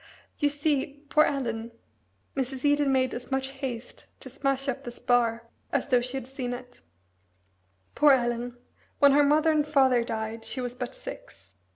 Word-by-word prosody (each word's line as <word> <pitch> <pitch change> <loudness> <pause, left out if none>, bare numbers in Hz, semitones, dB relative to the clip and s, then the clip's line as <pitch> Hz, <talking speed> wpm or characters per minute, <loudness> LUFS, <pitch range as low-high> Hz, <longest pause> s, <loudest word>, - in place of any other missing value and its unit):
"You 290 - +3
see, 290 0 -1
poor 305 0 +5
Ellen" 235 -5 -2 0.6
Mrs. 265 0 -3
Eden 290 -1 +3
made 260 -1 +2
as 245 - -7
much 265 0 -1
haste 260 -4 -6
to 260 - -7
smash 275 0 -1
up 270 +1 -2
the 245 - -5
spar 235 -1 +1 0.2
as 280 -1 0
though 250 -2 +4
she 250 +2 -4
had 265 - -5
seen 255 -1 -4
it 245 0 -10 1.1
"poor 295 -2 +6
Ellen, 240 -1 -1 0.4
when 280 -1 +6
her 290 +1 +5
mother 300 +3 +4
and 305 -1 +3
father 265 -5 +3
died 225 0 -4
she 260 - -6
was 245 -1 -3
but 250 -1 -6
six. 95 0 -10
260 Hz, 170 wpm, -27 LUFS, 245-280 Hz, 1.1 s, poor